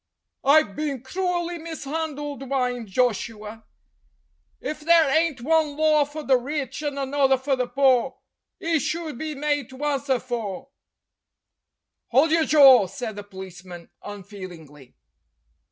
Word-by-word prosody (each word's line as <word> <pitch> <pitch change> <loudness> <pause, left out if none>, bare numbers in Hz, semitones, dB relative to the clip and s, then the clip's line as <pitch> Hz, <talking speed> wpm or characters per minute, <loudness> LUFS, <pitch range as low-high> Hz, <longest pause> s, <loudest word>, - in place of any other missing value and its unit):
"I've 280 -7 +4
bin 285 -5 -3
cruelly 350 +2 -2
mis'andled," 300 -2 -5
whined 250 -3 -2
Joshua. 220 0 -2 0.9
"If 305 - -5
there 320 -2 +4
ain't 320 -5 +1
one 305 +1 +1
law 305 -1 +4
for 300 +2 -8
the 265 -2 +4
rich 270 +1 -4
and 290 -2 -3
another 270 -1 +2
for 265 +1 0
the 250 -1 -2
paw, 265 0 +2 0.5
'e 330 -1 +1
should 320 -4 -4
be 310 -1 -4
made 290 -2 -1
to 260 - -12
awnswer 280 -2 0
for 235 -1 -5 0.7
" - - -60
"Hold 280 +6 +4
your 325 -1 +3
jaw!" 270 -9 +7
said 220 +3 -6
the 205 - -7
policeman 185 -3 -11
unfeelingly. 180 - -11
270 Hz, 130 wpm, -24 LUFS, 230-305 Hz, 0.9 s, jaw